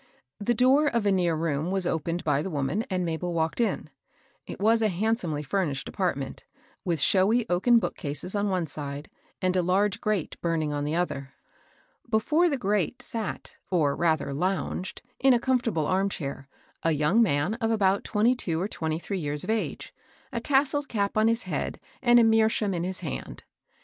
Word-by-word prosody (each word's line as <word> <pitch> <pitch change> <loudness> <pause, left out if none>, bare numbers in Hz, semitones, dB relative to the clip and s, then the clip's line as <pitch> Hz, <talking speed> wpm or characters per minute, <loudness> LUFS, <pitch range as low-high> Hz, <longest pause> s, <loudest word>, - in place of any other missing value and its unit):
The 235 +4 0
door 265 +6 +4
of 235 -6 0
a 200 - +4
near 175 -3 +2
room 155 0 -1
was 190 -1 0
opened 165 +1 -1
by 145 -2 +1
the 190 - -4
woman, 150 +7 -1
and 185 -2 -1
Mabel 170 +1 -2
walked 160 +7 0
in. 230 - -1 0.6
It - - -7
was 225 +3 +3
a 220 - +4
handsomely 185 -6 -1
ftimished 145 -3 -1
apartment, 140 -8 -2 0.4
with 170 -4 -1
showy 210 - +3
oaken 235 +7 +4
bookcases 150 -5 -2
on 205 0 0
one 185 -3 0
side, 145 -1 -6 0.3
and 185 0 +2
a 185 - +3
large 195 +3 +1
grate 210 -6 -2
burning 160 -3 0
on 145 0 -2
the 150 +2 -1
other. 140 -6 -2 0.8
Before 300 +11 +3
the 280 - 0
grate 205 -1 -1
sat, 225 -4 -5
or 155 -6 +2
rather 155 -4 +1
lounged, 185 +3 -2 0.2
in 265 -1 +5
a - - +2
comfortable 235 - 0
arm 190 +4 +1
chair, 140 -6 -5 0.3
a 165 - +2
young 150 +10 +3
man 155 -2 +2
of 225 - +1
about 200 -3 +2
twenty 220 +4 +2
two 170 -10 -2
or 190 - -1
twenty 160 -6 -2
three 190 +3 -4
years 145 -2 -1
of 200 - -1
age, 225 -1 -3 0.4
a - - -1
tas 275 -1 +3
selled 290 0 -2
cap 200 -3 -1
on 215 +1 +4
his 230 +1 +1
head, - - -3 0.2
and 240 0 +6
a - - +6
meerschaum 220 -2 +3
in 170 -1 -2
his 185 +1 -4
hand. 60 -2 -6
185 Hz, 185 wpm, -27 LUFS, 160-220 Hz, 0.8 s, and